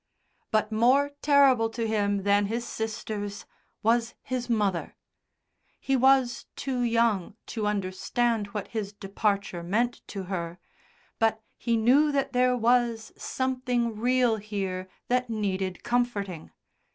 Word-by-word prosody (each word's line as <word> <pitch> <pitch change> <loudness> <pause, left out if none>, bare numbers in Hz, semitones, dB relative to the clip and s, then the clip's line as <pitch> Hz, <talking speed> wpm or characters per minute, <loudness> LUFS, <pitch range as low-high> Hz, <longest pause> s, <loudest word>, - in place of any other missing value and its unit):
But 215 0 +1
more 255 +6 +3
terrible 275 -6 +5
to 230 0 -3
him 205 -2 0
than 200 0 +3
his 235 +3 -2
sisters 210 -2 -4 0.4
was 230 +1 +2
his 250 -1 -3
mother. 205 -6 0 0.8
He 270 - 0
was 260 -2 +3
too 260 -3 -2
young 230 -5 +1 0.2
to 215 -3 -1
understand 210 +3 0
what 205 0 -5
his 210 -3 -4
departure 200 -2 -1
meant 230 +8 0
to 195 -2 -5
her, 175 -2 -4 0.6
but 220 -1 +1
he 235 -1 0
knew 270 +7 +4
that 275 -1 0
there 250 0 +3
was 235 -1 +2
something 250 -3 -1
real 245 0 +2
here 195 -3 -4 0.2
that 250 0 +1
needed 195 -4 -2
comforting. 210 -8 -1
225 Hz, 125 wpm, -27 LUFS, 205-245 Hz, 0.8 s, terrible